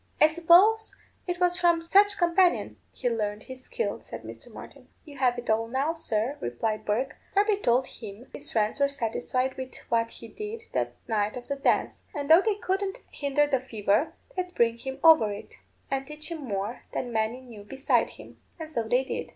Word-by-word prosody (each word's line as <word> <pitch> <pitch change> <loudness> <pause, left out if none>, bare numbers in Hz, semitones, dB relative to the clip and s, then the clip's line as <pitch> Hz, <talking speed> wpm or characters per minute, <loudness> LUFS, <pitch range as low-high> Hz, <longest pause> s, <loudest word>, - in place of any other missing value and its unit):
"I - - +8
suppose 345 +8 +5 0.3
it 355 0 -2
was 355 0 +3
from 345 -2 +4
some 385 +5 +5
such 410 - -3
companion 350 +1 +2
he 255 - -3
learned 215 -3 -1
his 260 0 -10
skill," - - -3
said - - -9
Mr. - - -11
Martin. - - -12 0.2
"You 285 -4 -12
have 250 -2 +2
it 240 - -6
all 220 +1 +1
now, 270 +7 0
sir," 260 -4 -1
replied 215 - -2
Bourke. 245 +6 -1 0.2
"Darby 410 +1 +3
told 250 -7 +2
him 220 +1 -10
his - - -7
friends 215 +4 0
were 280 0 +3
satisfied 255 0 -2
with 260 -1 -6 0.2
what 230 0 +2
he 230 - -12
did 425 - -7
the - - +1 0.2
night 215 0 0
of 245 - -9
the 280 - 0
dance; 275 - 0
and 290 +1 -1
though 330 +3 +9
they 430 0 +1
couldn't 390 0 -2
hinder 285 +1 +1
the 275 -3 +1
fever, 235 +4 0 0.2
they'd 360 -1 -3
bring 235 0 +2
him 265 +1 -5
over 315 -11 +7
it, 205 - -8 0.4
and 270 0 -1
teach 305 +2 -6
him 310 -5 -5
more 200 +2 -3
than 245 -2 -3
many 220 +3 0
knew 235 -5 -12
beside 270 +6 +1
him. - - -14 0.2
And 315 -1 -7
so 235 - 0
they 250 +3 +3
did. 265 - -4
265 Hz, 200 wpm, -27 LUFS, 230-335 Hz, 0.4 s, though